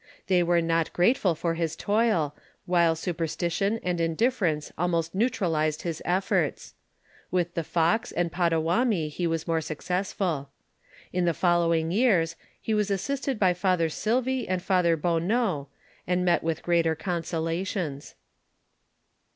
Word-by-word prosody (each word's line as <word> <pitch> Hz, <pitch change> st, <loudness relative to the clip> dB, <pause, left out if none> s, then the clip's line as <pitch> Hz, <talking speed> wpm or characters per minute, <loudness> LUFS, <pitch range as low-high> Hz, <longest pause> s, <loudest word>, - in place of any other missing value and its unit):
They 185 Hz, -2 st, +3 dB
were 170 Hz, 0 st, +2 dB
not 165 Hz, -1 st, 0 dB
grateful 180 Hz, -2 st, +3 dB
for 165 Hz, +1 st, -1 dB
his 165 Hz, -1 st, -2 dB
toil, 205 Hz, -8 st, +1 dB, 0.3 s
while 170 Hz, -2 st, +3 dB
superstition, 175 Hz, +5 st, -1 dB
and 180 Hz, -1 st, -1 dB
indifference 165 Hz, -, 0 dB
almost 170 Hz, -1 st, -1 dB
neutralized 165 Hz, -8 st, 0 dB
his 165 Hz, -3 st, -4 dB
efforts. 185 Hz, +2 st, 0 dB, 0.6 s
With 175 Hz, -1 st, 0 dB
the 165 Hz, -, -2 dB
Fox 170 Hz, +9 st, +1 dB
and 170 Hz, -1 st, -1 dB
Pottawatomi, 170 Hz, +2 st, +1 dB
he 170 Hz, +3 st, -2 dB
was 165 Hz, -1 st, -2 dB
more 165 Hz, -1 st, +1 dB
successful 175 Hz, -2 st, -2 dB, 0.6 s
In 180 Hz, -1 st, +1 dB
the 170 Hz, -2 st, +1 dB
following 170 Hz, -2 st, +2 dB
years, 185 Hz, -7 st, +2 dB, 0.2 s
he 220 Hz, -, -2 dB
was 210 Hz, -1 st, +1 dB
assisted 270 Hz, +6 st, -1 dB
by 190 Hz, -3 st, +4 dB
F. 180 Hz, -2 st, +1 dB
Silvy 250 Hz, +6 st, 0 dB
and 185 Hz, -1 st, +1 dB
F. -, -, -18 dB
Bonneault, 175 Hz, -, +1 dB, 0.4 s
and 180 Hz, 0 st, +1 dB
met 175 Hz, -, +3 dB
with 165 Hz, 0 st, -2 dB
greater 170 Hz, -2 st, +2 dB
consolations. 165 Hz, -2 st, -3 dB
175 Hz, 130 wpm, -27 LUFS, 165-190 Hz, 0.6 s, by